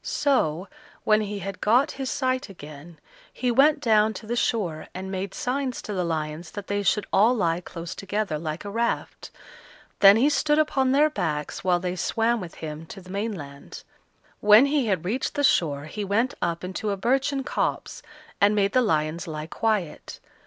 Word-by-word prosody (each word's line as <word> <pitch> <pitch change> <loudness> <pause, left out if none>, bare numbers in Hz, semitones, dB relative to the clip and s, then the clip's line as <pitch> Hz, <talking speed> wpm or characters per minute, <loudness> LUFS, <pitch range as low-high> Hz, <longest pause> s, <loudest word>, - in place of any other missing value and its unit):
So, 195 - 0 0.4
when 215 0 +3
he 205 -1 -4
had 195 0 -6
got 245 +7 +3
his 265 -1 -4
sight 260 -4 -1
again, 155 -2 -11 0.3
he 250 -1 -1
went 285 +5 +4
down 220 -3 +3
to - - -8
the 235 +2 -2
shore 180 -10 -1
and 190 +1 -5
made 190 0 -4
signs 255 0 -2
to 210 - -5
the 185 -2 -1
lions 160 0 -3
that 205 -4 -6
they 205 0 -1
should 205 0 +1
all 220 +6 +5
lie 170 -5 0
close 170 -1 -7
together 200 -5 -3
like 155 +3 -5
a 200 - -5
raft; 230 +2 -2 0.7
then 200 +1 +8
he 255 +5 +4
stood 295 +1 +2
upon 270 -4 +2
their 300 +3 +4
backs 155 - -3
while 180 -1 +2
they 180 0 -3
swam 225 +5 0
with 175 -2 -8
him 155 0 -7
to 195 - -9
the 185 -1 -13
mainland. 185 -9 -6 0.6
When 210 +5 +7
he 280 -4 +1
had 185 -5 0
reached 235 +8 -2
the 290 - 0
shore 145 - +2
he 205 +7 -5
went 220 +7 0
up 170 0 -2
into 185 +3 -3
a 200 - -1
birchen 270 +5 0
copse, - - -2 0.4
and 205 +1 +5
made 200 -1 +2
the 255 - +3
lions 160 -6 0
lie 155 -1 -5
quiet. 210 -2 -2
205 Hz, 185 wpm, -25 LUFS, 170-240 Hz, 0.7 s, then